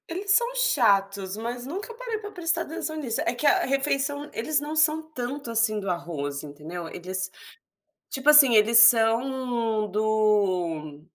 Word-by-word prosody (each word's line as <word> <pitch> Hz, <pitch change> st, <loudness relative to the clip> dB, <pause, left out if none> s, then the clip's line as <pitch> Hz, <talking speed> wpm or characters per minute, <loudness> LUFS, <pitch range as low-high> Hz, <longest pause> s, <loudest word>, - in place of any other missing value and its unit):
Eles 385 Hz, +4 st, -3 dB
são 475 Hz, +4 st, +4 dB
chatos, 200 Hz, -, +1 dB
mas 240 Hz, +2 st, -6 dB
nunca 390 Hz, -, -7 dB
parei 465 Hz, -1 st, -5 dB
para 415 Hz, -1 st, -9 dB
prestar 340 Hz, -3 st, -1 dB
atenção 315 Hz, 0 st, -6 dB
nisso, 250 Hz, -7 st, -3 dB
é -, -, -1 dB
que 245 Hz, +5 st, -5 dB
a -, -, +3 dB
refeição 280 Hz, +1 st, -2 dB
eles 290 Hz, +6 st, -1 dB
não 295 Hz, +2 st, -6 dB
são 310 Hz, 0 st, +3 dB
tanto 280 Hz, -4 st, -7 dB
assim 225 Hz, -2 st, +1 dB
do 195 Hz, -1 st, -5 dB
arroz 150 Hz, -5 st, -5 dB
entendeu, 155 Hz, +4 st, -9 dB
eles 185 Hz, +1 st, -5 dB, 0.8 s
tipo 270 Hz, +2 st, 0 dB
assim 285 Hz, -5 st, +7 dB
eles 220 Hz, +2 st, +4 dB
são 235 Hz, -1 st, +3 dB
do 190 Hz, -8 st, -1 dB
235 Hz, 150 wpm, -24 LUFS, 200-300 Hz, 0.8 s, assim